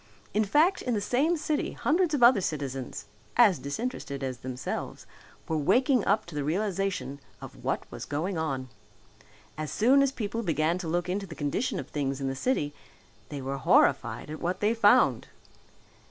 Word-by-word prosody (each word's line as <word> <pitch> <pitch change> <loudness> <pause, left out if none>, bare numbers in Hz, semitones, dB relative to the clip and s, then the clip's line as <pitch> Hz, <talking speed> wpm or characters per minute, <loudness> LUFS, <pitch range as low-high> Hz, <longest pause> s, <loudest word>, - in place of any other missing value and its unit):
In 215 - +3
fact 310 - +3
in 245 -2 -1
the - - +1
same 280 +11 +1
city 300 -1 -1
hundreds 330 0 +1
of 255 - +1
other 240 -4 +7
citizens, 135 -6 -4 0.3
as 215 -8 +6
disinterested 140 - -4
as 130 -2 -4
themselves, 130 0 -5 0.4
were 160 -1 0
waking 250 - +3
up 205 +2 +2
to 170 - -11
the 145 -1 -2
realization 185 -3 -2 0.2
of - - -11
what - - -1
was - - -7
going 165 +7 -2
on. 135 -5 -2 0.9
As 155 -1 -3
soon 260 +6 +4
as 275 -1 +2
people 230 -3 -3
began 165 -2 0
to 175 - -5
look 175 +2 -1
into 195 +2 -2
the 165 - -9
condition 185 - -1
of - - -6
things 135 -2 -2
in 135 - -2
the 135 - -2
city 145 - -1 0.6
they 145 -3 -6
were 135 +1 -3
horrified 140 - +2
at 155 - -7
what 175 +2 -1
they 210 +2 +2
found. 225 - +4
180 Hz, 175 wpm, -28 LUFS, 145-235 Hz, 0.9 s, other